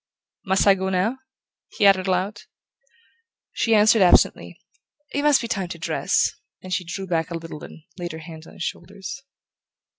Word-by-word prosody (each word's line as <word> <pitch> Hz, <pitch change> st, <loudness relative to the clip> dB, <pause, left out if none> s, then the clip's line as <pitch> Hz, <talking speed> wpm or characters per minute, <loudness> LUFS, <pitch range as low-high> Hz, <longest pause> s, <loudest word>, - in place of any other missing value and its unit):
Must 190 Hz, 0 st, +2 dB
I 200 Hz, -, +7 dB
go 190 Hz, 0 st, -2 dB
now?" 195 Hz, +8 st, 0 dB, 0.6 s
he 205 Hz, -, +3 dB
added 195 Hz, -1 st, +5 dB
aloud. 190 Hz, +3 st, -1 dB, 1.1 s
She 225 Hz, -1 st, +1 dB
answered 215 Hz, +1 st, +5 dB
absently: 180 Hz, -, +3 dB, 0.5 s
"It 285 Hz, -, 0 dB
must 295 Hz, -2 st, +4 dB
be 230 Hz, -, -4 dB
time 195 Hz, -5 st, -2 dB
to 170 Hz, -, -7 dB
dress"; 170 Hz, +4 st, 0 dB, 0.3 s
then 185 Hz, -, -9 dB
she 185 Hz, -, 0 dB
drew 190 Hz, +3 st, -5 dB
back 165 Hz, -3 st, -1 dB
a 170 Hz, -, -3 dB
little 165 Hz, -2 st, -9 dB
and 160 Hz, -, -12 dB, 0.2 s
laid 175 Hz, -2 st, -4 dB
her -, -, -6 dB
hands 160 Hz, 0 st, -11 dB
on -, -, -14 dB
his -, -, -6 dB
shoulders. 195 Hz, +7 st, -6 dB
190 Hz, 175 wpm, -23 LUFS, 170-205 Hz, 1.1 s, I